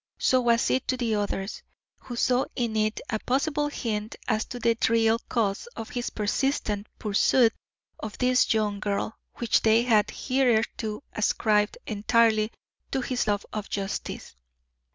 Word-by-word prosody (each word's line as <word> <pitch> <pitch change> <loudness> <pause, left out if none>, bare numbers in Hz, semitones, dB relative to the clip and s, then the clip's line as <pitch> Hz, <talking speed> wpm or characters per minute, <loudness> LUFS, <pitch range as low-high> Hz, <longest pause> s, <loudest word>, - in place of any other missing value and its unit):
So 255 -1 +3
was 235 -1 +2
it 260 - 0
to 255 - 0
the 235 -3 0
others, 205 -1 -2 0.4
who 245 - -8
saw 250 +2 +2
in 235 -3 -1
it 215 0 +1
a 215 - 0
possible 295 +4 0
hint 220 -6 -3
as 220 -2 +1
to 250 - -7
the 230 -1 +2
real 225 0 +3
cause 215 - 0
of 225 - -7
his 245 -1 -2
persistent 210 -1 -1
pursuit 225 +3 +3 0.5
of 215 -1 -6
this 250 0 +3
young 210 -2 +1
girl, 205 +1 -2 0.2
which 235 -2 +2
they 225 +1 +4
had 215 -4 +3
hitherto 235 -3 0
ascribed 210 -1 +1
entirely 215 +1 +2 0.4
to 265 - -1
his 250 -3 -1
love 205 -1 0
of 210 -1 -4
justice. 195 - -4
225 Hz, 150 wpm, -26 LUFS, 210-245 Hz, 0.5 s, they